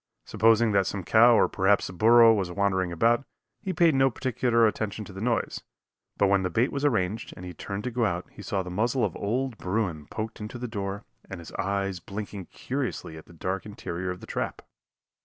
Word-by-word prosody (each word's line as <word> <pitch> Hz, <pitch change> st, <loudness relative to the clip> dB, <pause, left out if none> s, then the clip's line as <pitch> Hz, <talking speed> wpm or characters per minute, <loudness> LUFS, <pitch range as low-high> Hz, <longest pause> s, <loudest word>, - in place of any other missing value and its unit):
Supposing 115 Hz, +1 st, +3 dB
that 100 Hz, -2 st, +2 dB
some 100 Hz, -2 st, -3 dB
cow 115 Hz, +5 st, +6 dB
or -, -, +4 dB
perhaps 100 Hz, +1 st, +2 dB
the -, -, -6 dB
burro 115 Hz, +4 st, +7 dB
was 95 Hz, -5 st, -1 dB
wandering 95 Hz, -1 st, 0 dB
about, 115 Hz, +9 st, +2 dB, 0.4 s
he 190 Hz, -, -3 dB
paid 170 Hz, -3 st, +4 dB
no 135 Hz, 0 st, +4 dB
particular 120 Hz, -2 st, +1 dB
attention 110 Hz, 0 st, -2 dB
to 100 Hz, -, -11 dB
the 95 Hz, -, -7 dB
noise, 115 Hz, 0 st, -1 dB, 0.6 s
but -, -, +3 dB
when 100 Hz, 0 st, +3 dB
the 90 Hz, -, -1 dB
bait 115 Hz, +9 st, +1 dB
was 140 Hz, -, -3 dB
arranged 110 Hz, -5 st, 0 dB
and 90 Hz, -, -8 dB
he 90 Hz, -, -7 dB
turned 100 Hz, +4 st, -6 dB
to 125 Hz, -, -3 dB
go 120 Hz, 0 st, 0 dB
out 90 Hz, -4 st, -1 dB
he -, -, -12 dB
saw 95 Hz, -1 st, -2 dB
the 90 Hz, -, -7 dB
muzzle 115 Hz, +5 st, +1 dB
of 95 Hz, -, -4 dB
old 120 Hz, +3 st, -2 dB
bruin 90 Hz, -6 st, -2 dB
poked 110 Hz, +4 st, -5 dB
into 105 Hz, +3 st, -6 dB
the 125 Hz, +1 st, -4 dB
door 100 Hz, -2 st, -4 dB, 0.2 s
and 95 Hz, -, -6 dB
his 85 Hz, -, -10 dB
eyes 100 Hz, -1 st, -2 dB
blinking 100 Hz, 0 st, -7 dB
curiously 130 Hz, -, -4 dB
at 80 Hz, -, -12 dB
the -, -, -15 dB
dark 95 Hz, +4 st, -3 dB
interior 95 Hz, -3 st, -5 dB
of 90 Hz, 0 st, -5 dB
the -, -, -9 dB
trap. -, -, -4 dB
105 Hz, 215 wpm, -27 LUFS, 95-115 Hz, 0.6 s, burro